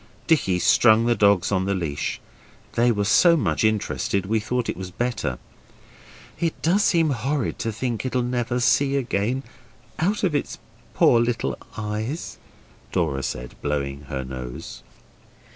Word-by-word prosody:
Dicky 115 - +2
strung 110 +4 +5
the 120 - +3
dogs 100 -5 +3
on 95 -2 +1
the 100 0 0
leash; 80 -6 -3 0.5
they 120 +1 +3
were 105 -2 0
so 170 - +5
much 85 - 0
interested 105 -2 0
we 110 +3 +1
thought 120 +3 -2
it - - -2
was 95 0 -6
better. 100 - -2 1.0
'It 165 -2 -1
does 190 +6 +3
seem 165 -3 +3
horrid 135 +2 -2
to 115 - -2
think 115 +1 -3
it'll 130 -1 0
never 120 0 -1
see 125 +4 +3
again 125 0 -1 0.6
out 200 +7 0
of 180 -5 +2
its 145 - -2 0.4
poor 120 - +5
little 115 - -1 0.2
eyes,' 110 +7 -4 0.5
Dora 80 -7 0
said, 60 -1 -5
blowing 70 -1 -3
her 65 0 -4
nose. 65 -1 -7
110 Hz, 145 wpm, -23 LUFS, 90-125 Hz, 1.0 s, strung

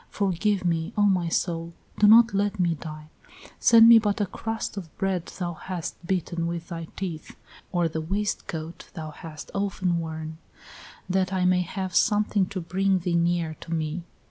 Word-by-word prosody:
Forgive 195 0 0
me, 165 +3 0
O 205 - +4
my 185 -4 +2
soul! 170 0 -1 0.3
Do 210 - +6
not 225 +1 +7
let 205 +1 0
me 175 -2 +2
die.... 155 0 -9 0.5
Send 230 -1 +7
me 230 -1 +9
but 210 -2 -1
a 205 - +2
crust 225 +3 -4
of 185 -5 -6
bread 190 -3 -1
thou 175 -2 -4
hast 175 +1 -5
bitten 175 -2 -1
with 170 0 -5
thy 165 -2 -5
teeth, 170 -5 -6 0.4
or 175 -2 +2
the 160 0 -3
waistcoat 170 -3 -4
thou 155 -3 -6
hast 155 0 -10
often 190 -3 0
worn, 160 -1 -6 0.7
that 185 0 +1
I 185 -1 +1
may 180 0 +4
have 185 0 -4
something 210 -2 +2
to 195 -1 -5
bring 190 +3 +1
thee 175 -1 -2
near 170 -1 +1
to - - -9
me." 160 +1 -2
180 Hz, 170 wpm, -26 LUFS, 165-195 Hz, 0.7 s, me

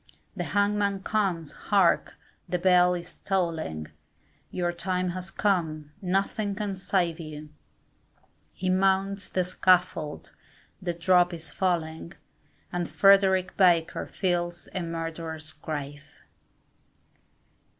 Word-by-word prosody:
The - - -3
hangman 200 -1 +1
comes, 185 -8 0
hark, 195 -4 +2 0.3
the 180 - +1
bell 180 0 +4
is 175 0 -8
tolling, 165 - -2 0.6
Your 175 -1 -1
time 180 +1 -1
has 185 +1 -5
come, 160 -6 -1
nothing 195 +2 0
can 205 -1 -3
save 180 -3 0
you, 155 -1 -8 1.0
He 185 - -5
mounts 195 +1 +1
the 185 - +1
scaffold, 180 -4 +1 0.5
the 175 -2 -2
drop 175 0 +3
is 165 -1 -8
falling, 170 -2 -2 0.6
And 175 -1 -2
Frederick 190 -2 +4
Baker 175 -4 +3
fills 175 -2 -2
a 185 - -2
murderer's 165 -1 -4
grave. 145 - -7
180 Hz, 105 wpm, -27 LUFS, 165-190 Hz, 1.0 s, bell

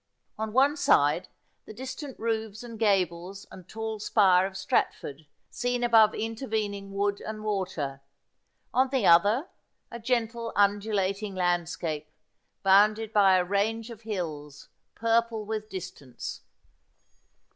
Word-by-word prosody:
On 220 0 -2
one 275 +5 +4
side 150 - +3 0.4
the 215 - -10
distant 260 +2 -7
roofs 220 -1 -3
and 230 -2 -9
gables 195 -2 0
and 185 -2 -13
tall 220 -1 -4
spire 190 -3 +4
of 195 - -10
Strat 195 - 0
ford, 145 +2 -9 0.2
seen 245 0 -1
above 225 -3 +5
intervening 215 -3 -3
wood 200 0 -1
and 215 0 -6
water; 185 -10 -3 0.7
on 260 +1 +3
the 260 -6 0
other 205 - +5 0.4
a 235 - -7
gentle 230 -1 -1
undulating 200 -1 +1
landscape, 175 -3 -1 0.5
bounded 210 +3 +4
by 195 -2 +5
a 180 - +1
range 220 +4 -1
of 225 -2 -11
hills 155 -9 -6 0.3
purple 230 -1 +1
with 215 0 -4
distance. 170 - -7
210 Hz, 125 wpm, -27 LUFS, 185-225 Hz, 0.7 s, above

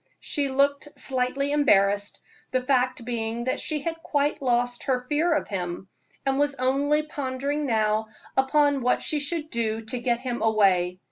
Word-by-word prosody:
She 285 -2 -2
looked 280 +2 +1
slightly 265 +2 0
embarrassed, 205 -8 +3 0.3
the 255 - 0
fact 255 -2 +1
being 230 -1 -2
that 255 - -1
she 305 -2 -2
had 330 +2 -4
quite 290 -1 0
lost 245 -1 0
her 250 -2 0
fear 310 +4 +1
of - - -1
him, 180 -1 -4 0.4
and 270 0 +1
was 290 -1 +1
only 280 +4 +1
pondering 285 0 -2
now 220 -2 +1 0.3
upon 285 +1 +3
what 250 +1 +1
she 305 - 0
should 310 +1 -3
do 225 -1 -1
to 235 +3 -4
get 240 -1 0
him 245 -2 -3
away. 190 -5 +3
260 Hz, 160 wpm, -25 LUFS, 230-285 Hz, 0.4 s, embarrassed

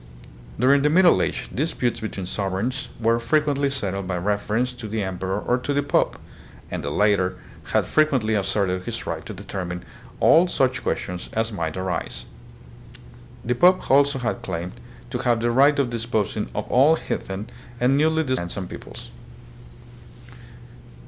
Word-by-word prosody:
During 135 +3 +5
the 150 - +3
middle 175 +2 +5
age, - - -2
disputes 130 -4 -1
between 100 -4 -5
sovereigns 100 +8 -2
were 115 0 +2
frequently 145 +2 +1
settled 100 -8 -3
by 90 -1 -1
reference 105 +6 0
to 120 -3 -8
the 110 0 -2
em 95 -2 -4
peror 95 +2 -3
or 125 +1 +2
to 145 +3 -2
the 145 - +2
pope, 145 - +1 0.5
and 90 -3 -3
the 70 - -2
latter 95 +1 +2 0.3
had - - +1
frequently 135 -8 +2
asserted 95 -2 0
his 115 -1 -4
right 80 -1 -4
to 110 - -6
determine 90 -2 -5 0.3
all 170 +3 +6
such 130 -6 +1
questions 90 -1 -3
as 115 +1 0
might 85 -4 -3
arise. 95 -3 -3 1.2
The 120 - +1
pope 180 +8 +5
had - - 0
also 140 0 +4
claimed 110 -8 -3 0.4
to - - -2
have 120 -2 +2
the 120 +1 +1
right 140 +4 +5
of 135 -4 +1
disposing 110 -3 -1
of - - -2
all 140 +6 +6
heathen 100 -8 -5 0.3
and 125 +2 +3
newly 160 +2 +3
discovered 130 -3 0
lands 85 +2 -5
and 95 -2 -4
peoples. - - -10
115 Hz, 160 wpm, -23 LUFS, 95-135 Hz, 1.2 s, all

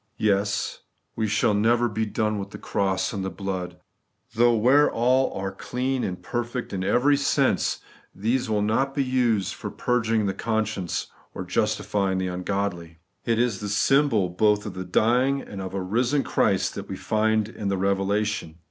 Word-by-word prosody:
Yes, 100 -1 0 0.4
we 110 -1 0
shall 105 0 +2
never 115 +4 +3
be 110 0 -2
done 105 0 -1
with 100 0 -5
the - - -9
cross 95 0 -1
and 100 -2 -3
the 95 - -2
blood; 90 -1 -5 0.6
though, 120 +1 +4
where 130 +7 +5
all 125 +3 +2
are 95 0 -3
clean 125 +6 -2
and 90 -1 -3
perfect 120 -1 -4
in 95 -1 -2
every 125 +9 +3
sense, 140 0 +1 0.3
these 120 +6 0
wiU 105 -2 +1
not 135 +6 0
be 140 - +2
used 120 -6 +1
for - - -6
purging 115 -3 0
the 95 - 0
conscience 110 -4 -2 0.3
or - - -4
justifying 100 0 0
the 95 - -1
ungodly. 90 -2 -3 0.3
It 115 -1 +1
is 120 -4 +1
the 105 - -4
symbol 115 -2 +3
both 105 +3 +2
of 100 -3 -6
a 95 - -4
dying 125 +9 +2
and 100 -7 -8
of 95 0 -6
a 95 - -1
risen 120 +8 +1
Christ - - +1
that - - -7
we - - -4
find 110 0 +1
in 105 -2 -6
the 100 -1 0
Eevelation. 100 -2 0
105 Hz, 175 wpm, -25 LUFS, 95-120 Hz, 0.6 s, where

